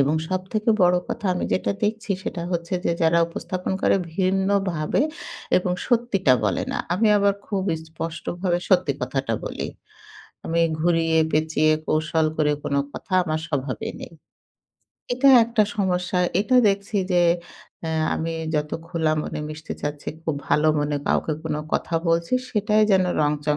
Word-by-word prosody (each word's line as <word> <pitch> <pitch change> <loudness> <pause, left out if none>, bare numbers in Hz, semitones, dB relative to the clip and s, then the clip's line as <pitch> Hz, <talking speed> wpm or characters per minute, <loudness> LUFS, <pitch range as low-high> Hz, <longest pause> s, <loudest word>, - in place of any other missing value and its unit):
এবং 140 +3 +3
সবথেকে 190 +4 -1
বড় 180 0 +5
কথা 200 - -3
আমি - - -2
যেটা 185 - +1
দেখছি, 215 0 -2
সেটা 170 - -4
হচ্ছে 170 +1 -2
যে, - - +2
যারা 165 +1 +4
উপস্থাপন 180 +2 -4
করে - - +4 0.2
ভিন্নভাবে 190 -3 +1 0.6
এবং 180 0 +1
সত্যিটা 225 - +3
বলে 100 -4 0
না। - - -2 0.2
আমি 215 +4 +3
আবার 200 0 +3
খুব 195 -3 -1 0.3
স্পষ্টভাবে 175 +2 -3
সত্যি 180 -7 +3
কথাটা 135 -5 -1
বলি। - - -4 0.8
আমি 170 +1 0 0.2
ঘুরিয়ে-পেঁচিয়ে 160 -2 +2
কৌশল 155 +1 +1
করে 150 -1 +2
কোন 140 - -1 0.2
কথা - - -10
আমার 155 0 -1
স্বভাবে 135 -3 -3
নেই। - - -9 1.0
এটা 275 +2 +4 0.2
একটা 230 -1 +2
সমস্যা; 180 -2 0 0.2
এটা 250 +5 +2
দেখছি 200 +1 -1 0.2
যে, 175 - +4 0.6
অ্যা 160 - -3 0.2
আমি 165 0 -3 0.2
যত 150 0 0 0.2
খোলা 160 -3 0
মনে - - -5
মিশতে 155 +1 -7
চাচ্ছি, 145 0 -4
খুব 160 -3 -1
ভালো 155 +1 +3
মনে 145 0 0
কাউকে 155 - +1
কোন 160 - -1 0.2
কথা 170 - -1
বলছি, 170 +7 +1 0.2
সেটাই 210 0 +2
যেন 190 -1 +4 0.2
রংচং 150 0 +1
170 Hz, 145 wpm, -23 LUFS, 155-195 Hz, 1.0 s, বড়